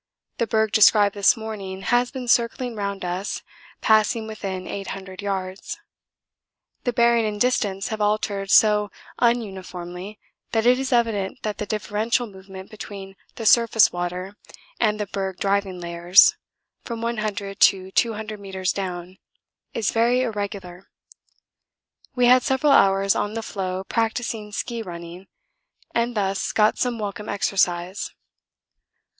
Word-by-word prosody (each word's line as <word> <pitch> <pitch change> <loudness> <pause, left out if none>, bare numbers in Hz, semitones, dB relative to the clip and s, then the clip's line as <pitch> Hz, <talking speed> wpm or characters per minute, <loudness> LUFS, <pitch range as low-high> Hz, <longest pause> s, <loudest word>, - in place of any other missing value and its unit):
The 235 - +1
berg 220 -1 +1
described 205 -1 +5
this 200 +3 +4
morning 200 -4 -6
has 245 0 +2
been 255 -2 -7
circling 235 +1 +1
round 200 -2 -3
us, 180 +3 -3 0.4
passing 220 +1 +3
within 195 -4 -5
800 195 -1 -6
yards; 195 - -4 1.1
the 245 - +2
bearing 235 0 +3
and 210 -1 -4
distance 205 -5 0
have 220 -1 -4
altered 205 -1 0
so 210 0 +5 0.3
un 240 0 +3
uniformly 185 0 -8 0.4
that 225 0 +1
it 250 +1 +5
is 265 0 -3
evident 225 -6 0
that 215 -1 -3
the 210 - -3
differential 215 +3 -1
movement 190 -2 -11
between 195 -2 -9 0.2
the 225 - -6
surface 230 0 +5
water 180 +3 -4 0.4
and 215 -2 +1
the 210 - -1
berg 190 -2 -4
driving 195 -2 0
layers 175 +2 +5 0.5
(from 230 -1 -5
100 215 -3 -3
to 190 -1 +4
200 215 -1 -1
metres 190 -1 -2
down) 185 0 -5 0.6
is 220 -3 0
very 235 +2 +3
irregular. 200 -6 -5 1.3
We 250 -1 +3
had 250 +1 +6
several 265 +3 +2
hours 195 -4 +4
on 210 +1 -2
the 225 - -3
floe 185 -3 -4
practising 225 0 -2
ski 235 +2 -4
running, 175 -1 -9 0.7
and 235 0 0
thus 195 -1 -1
got 215 0 +3
some 245 -2 0
welcome 210 -1 -5
exercise. 185 -1 -1
205 Hz, 135 wpm, -23 LUFS, 190-225 Hz, 1.3 s, had